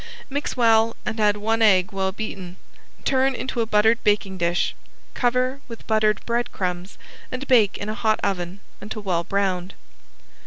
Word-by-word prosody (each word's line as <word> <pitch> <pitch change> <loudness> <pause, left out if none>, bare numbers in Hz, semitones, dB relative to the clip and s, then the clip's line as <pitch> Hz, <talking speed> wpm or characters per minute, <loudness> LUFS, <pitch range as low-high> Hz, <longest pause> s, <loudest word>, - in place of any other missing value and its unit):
Mix 285 -1 -3
well 225 -1 +4
and 220 - -3
add 210 -1 +3
one 225 +2 0
egg 195 -2 +4
well 190 -1 -1
beaten. 190 -3 -6 0.5
Turn 265 0 +2
into 250 -2 -2
a 225 - -1
buttered 220 +2 +3
baking 200 -2 +1
dish, 175 0 +1 0.4
cover 255 +2 0
with 230 -2 -10
buttered 215 -1 +1
breadcrumbs 190 -6 -2 0.3
and 255 +2 -5
bake 225 -6 +4
in 205 - -5
a 215 - -2
hot 220 0 +1
oven 185 0 -2 0.2
until 215 +1 -6
well 175 -3 0
browned. 190 -1 -1
215 Hz, 155 wpm, -23 LUFS, 190-230 Hz, 0.5 s, well